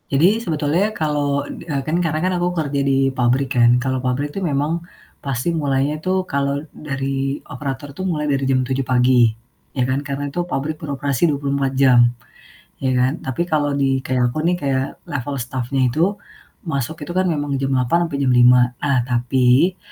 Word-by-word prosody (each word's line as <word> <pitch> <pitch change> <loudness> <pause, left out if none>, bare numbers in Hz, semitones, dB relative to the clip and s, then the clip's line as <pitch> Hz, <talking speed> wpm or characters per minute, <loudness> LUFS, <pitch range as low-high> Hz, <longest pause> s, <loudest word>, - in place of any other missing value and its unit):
Jadi 180 +11 +3
sebetulnya 165 +1 0
kalau 145 -2 0
d - - -8
eee, 140 -2 -1
kan 155 +2 0
karena 175 +2 0
aku 175 0 +1
kerja 145 -3 -1
di 135 -1 +2
pabrik 130 +2 +1
kan. 120 0 +5
Kalau 130 -1 -1
pabrik 130 +3 -1
itu 195 - -4
memang 155 0 0 0.4
pasti 135 +5 -2
mulainya 145 -1 0
tuh 185 +2 0
kalau 140 -2 -1
dari 135 -1 -3
operator 140 0 -6
tuh 185 +6 -5
mulai 155 -4 -1
dari 135 -1 0
jam 130 -1 +2
7 130 +1 -1
pagi. 125 -2 +4 0.5
Ya 130 - +2
kan. 130 +2 0
Karena 140 0 -3
itu 175 - -1
pabrik 155 -1 -2
beroperasi 145 0 0
24 140 -2 -1
jam. 130 -3 +5 0.8
Ya 130 - +2
kan. 130 +2 +2
Tapi 130 +4 -3
kalau 150 -3 +1
di, 135 -1 +1
kayak 125 -1 +1
aku 155 - -2
nih, 175 +1 +3
kayak 135 -3 0 0.2
level 145 0 -3
stafnya 130 +1 -1
itu. 150 +7 +1 0.6
Masuk 145 0 -3
itu 175 - -6
kan 185 0 +1
memang 145 -3 -1
jam 135 - 0
8.00 135 +6 +2
sampai 140 - -3
jam 130 - +3
5.00. 125 0 +5
Nah, 140 -2 +2
tapi, 125 +7 +2
140 Hz, 180 wpm, -20 LUFS, 130-155 Hz, 0.8 s, kan